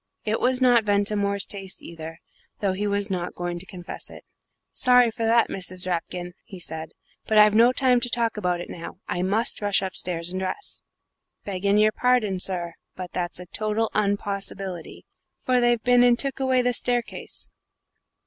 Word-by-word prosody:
It 215 Hz, +1 st, 0 dB
was 255 Hz, +1 st, +1 dB
not 245 Hz, -3 st, +5 dB
Ventimore's 200 Hz, -1 st, +1 dB
taste 195 Hz, -2 st, -7 dB
either, 165 Hz, -1 st, -9 dB, 0.4 s
though 195 Hz, -2 st, 0 dB
he 205 Hz, +2 st, -2 dB
was 200 Hz, 0 st, 0 dB
not 175 Hz, -2 st, -3 dB
going 175 Hz, 0 st, -3 dB
to 185 Hz, -, -9 dB
confess 180 Hz, -3 st, -7 dB
it. -, -, -12 dB, 0.5 s
"Sorry 250 Hz, -2 st, +4 dB
for 230 Hz, 0 st, -3 dB
that, 230 Hz, +1 st, +4 dB
Mrs. 185 Hz, -1 st, -2 dB
Rapkin," 180 Hz, 0 st, -3 dB
he 195 Hz, -, -11 dB
said, 160 Hz, -2 st, -6 dB, 0.3 s
"but 220 Hz, -, +2 dB
I've 210 Hz, 0 st, +7 dB
no 230 Hz, +3 st, +6 dB
time 255 Hz, -1 st, +3 dB
to 245 Hz, -, -1 dB
talk 235 Hz, -2 st, 0 dB
about 180 Hz, -4 st, -1 dB
it -, -, -7 dB
now. 170 Hz, -, -8 dB
I 175 Hz, -, -2 dB
must 210 Hz, +6 st, 0 dB
rush 205 Hz, -1 st, +2 dB
upstairs 175 Hz, -2 st, -2 dB
and 185 Hz, -, -3 dB
dress." 190 Hz, -, -4 dB, 0.6 s
"Begging 200 Hz, +1 st, +1 dB
your 215 Hz, 0 st, +5 dB
pardon, 225 Hz, -6 st, +1 dB
sir, 175 Hz, -2 st, 0 dB, 0.2 s
but 185 Hz, -1 st, -7 dB
that's 175 Hz, -1 st, -3 dB
a 180 Hz, -, -8 dB
total 215 Hz, +4 st, -1 dB
unpossibility 200 Hz, -3 st, -2 dB, 0.3 s
for 255 Hz, -1 st, +2 dB
they've 240 Hz, -2 st, +2 dB
been 245 Hz, 0 st, +5 dB
and 245 Hz, -1 st, +5 dB
took 275 Hz, 0 st, +1 dB
away 260 Hz, -1 st, +2 dB
the 245 Hz, 0 st, +1 dB
staircase.' 240 Hz, 0 st, -2 dB
205 Hz, 175 wpm, -25 LUFS, 180-235 Hz, 0.6 s, I've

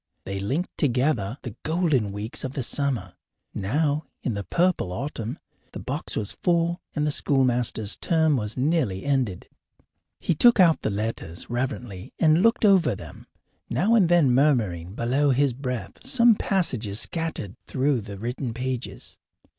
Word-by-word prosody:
They 95 Hz, 0 st, -4 dB
linked 135 Hz, -, -2 dB
together 125 Hz, -, +1 dB
the 120 Hz, -5 st, -7 dB
golden 155 Hz, -, +1 dB
weeks 105 Hz, +3 st, -4 dB
of 130 Hz, -, -4 dB
the 135 Hz, -, -2 dB
summer. 120 Hz, -9 st, -1 dB, 0.4 s
Now, 145 Hz, +9 st, 0 dB, 0.2 s
in 120 Hz, -, -1 dB
the 100 Hz, -1 st, -4 dB
purple 175 Hz, -, +1 dB
autumn, 120 Hz, -, -4 dB, 0.4 s
the -, -, -6 dB
box -, -, -4 dB
was 105 Hz, -2 st, -1 dB
full, 170 Hz, 0 st, +1 dB
and 150 Hz, -1 st, 0 dB
the 150 Hz, -, +1 dB
schoolmaster's 125 Hz, -7 st, +1 dB
term 160 Hz, -3 st, +2 dB
was 110 Hz, -2 st, -3 dB
nearly 130 Hz, -, 0 dB
ended. 130 Hz, -10 st, -1 dB, 0.7 s
He -, -, 0 dB
took 235 Hz, +8 st, +5 dB
out 170 Hz, -4 st, +5 dB
the -, -, -1 dB
letters 105 Hz, -4 st, -4 dB
reverently 120 Hz, -6 st, -4 dB
and 160 Hz, +1 st, +4 dB
looked 230 Hz, +1 st, +3 dB
over 185 Hz, -, +4 dB
them, -, -, -11 dB, 0.4 s
now 175 Hz, -, +2 dB
and 200 Hz, -7 st, +4 dB
then 170 Hz, -7 st, +4 dB
murmuring 105 Hz, -, +1 dB
below 130 Hz, +6 st, +1 dB
his 135 Hz, 0 st, +2 dB
breath 125 Hz, -1 st, -5 dB
some 240 Hz, -3 st, +5 dB
passages 125 Hz, -, -1 dB
scattered 160 Hz, -, -2 dB
through 135 Hz, -2 st, +1 dB
the 100 Hz, -1 st, -8 dB
written 120 Hz, +2 st, -4 dB
pages. 130 Hz, 0 st, -5 dB
130 Hz, 150 wpm, -25 LUFS, 110-160 Hz, 0.7 s, took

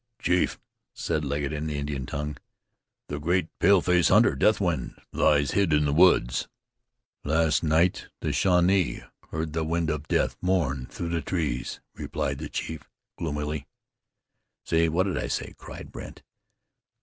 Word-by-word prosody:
"Chief," 90 Hz, 0 st, +1 dB, 0.4 s
said 80 Hz, -2 st, -1 dB
Legget 70 Hz, +1 st, -2 dB
in 75 Hz, +1 st, -3 dB
the 75 Hz, -2 st, -3 dB
Indian 70 Hz, -3 st, -3 dB
tongue. 75 Hz, 0 st, -4 dB, 0.7 s
"The 75 Hz, -, -4 dB
great 85 Hz, +2 st, +1 dB
paleface 90 Hz, -2 st, +4 dB
hunter, 110 Hz, +6 st, +5 dB
Deathwind, 90 Hz, -, +1 dB
lies 70 Hz, -1 st, +3 dB
hid 100 Hz, -5 st, +2 dB
in 75 Hz, 0 st, +3 dB
the 70 Hz, -, +1 dB
woods." 75 Hz, -8 st, +4 dB, 0.8 s
"Last 80 Hz, 0 st, +2 dB
night 80 Hz, +3 st, +2 dB
the -, -, -2 dB
Shawnee 90 Hz, 0 st, +2 dB, 0.3 s
heard 80 Hz, -1 st, -3 dB
the 80 Hz, 0 st, 0 dB
wind 80 Hz, 0 st, 0 dB
of 75 Hz, 0 st, -4 dB
death -, -, +1 dB
mourn 75 Hz, -9 st, 0 dB
through 85 Hz, -, -5 dB
the 85 Hz, -1 st, -1 dB
trees," 75 Hz, -6 st, -2 dB
replied 70 Hz, 0 st, -3 dB
the 75 Hz, 0 st, -5 dB
chief 80 Hz, -1 st, -5 dB, 0.3 s
gloomily. 75 Hz, -2 st, -3 dB, 1.0 s
"See! 80 Hz, 0 st, +2 dB
What 85 Hz, +4 st, +2 dB
did 95 Hz, -2 st, -1 dB
I -, -, -2 dB
say?" -, -, -3 dB
cried -, -, -10 dB
Brandt. -, -, -9 dB
80 Hz, 145 wpm, -26 LUFS, 75-90 Hz, 1.0 s, hunter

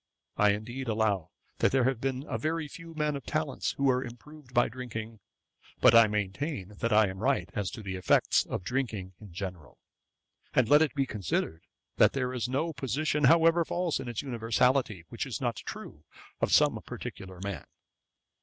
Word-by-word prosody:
I 105 Hz, -1 st, +4 dB
indeed 120 Hz, +5 st, -5 dB
allow 105 Hz, -6 st, 0 dB, 0.3 s
that -, -, +3 dB
there 130 Hz, -1 st, +3 dB
have 130 Hz, -2 st, 0 dB
been 135 Hz, +1 st, -2 dB
a -, -, -3 dB
very 160 Hz, 0 st, -1 dB
few 165 Hz, +2 st, -11 dB
men 150 Hz, -1 st, 0 dB
of 140 Hz, -, -6 dB
talents 155 Hz, -3 st, -2 dB
who 140 Hz, -, -4 dB
were 130 Hz, -1 st, +3 dB
improved 130 Hz, +3 st, -12 dB
by 120 Hz, -1 st, +3 dB
drinking; 115 Hz, -2 st, -7 dB, 0.6 s
but -, -, +7 dB
I 115 Hz, -1 st, +8 dB
maintain 105 Hz, -, -3 dB
that 115 Hz, -, 0 dB
I 110 Hz, 0 st, +5 dB
am 95 Hz, 0 st, -6 dB
right 135 Hz, +5 st, +1 dB
as 100 Hz, -4 st, -2 dB
to 110 Hz, -, -8 dB
the 95 Hz, -1 st, -4 dB
effects 90 Hz, -, +3 dB
of -, -, -4 dB
drinking 110 Hz, -5 st, -3 dB
in 105 Hz, -4 st, -11 dB
general: 90 Hz, -4 st, -7 dB, 0.8 s
and 125 Hz, -3 st, +4 dB
let 145 Hz, +4 st, +6 dB
it 155 Hz, -3 st, +1 dB
be 135 Hz, -1 st, +1 dB
considered, 90 Hz, -6 st, -2 dB, 0.3 s
that -, -, +5 dB
there 125 Hz, -2 st, -1 dB
is 125 Hz, -1 st, -2 dB
no 155 Hz, +6 st, -1 dB
position, 145 Hz, +3 st, 0 dB
however 165 Hz, +3 st, +5 dB
false 175 Hz, 0 st, -1 dB
in -, -, -6 dB
its 120 Hz, -, -3 dB
universality, 120 Hz, -4 st, +1 dB
which -, -, -4 dB
is -, -, -4 dB
not -, -, -1 dB
true 75 Hz, -, -8 dB, 0.4 s
of -, -, 0 dB
some -, -, +4 dB
particular 95 Hz, -2 st, -8 dB
man.' 100 Hz, 0 st, -5 dB
120 Hz, 180 wpm, -29 LUFS, 105-140 Hz, 0.8 s, I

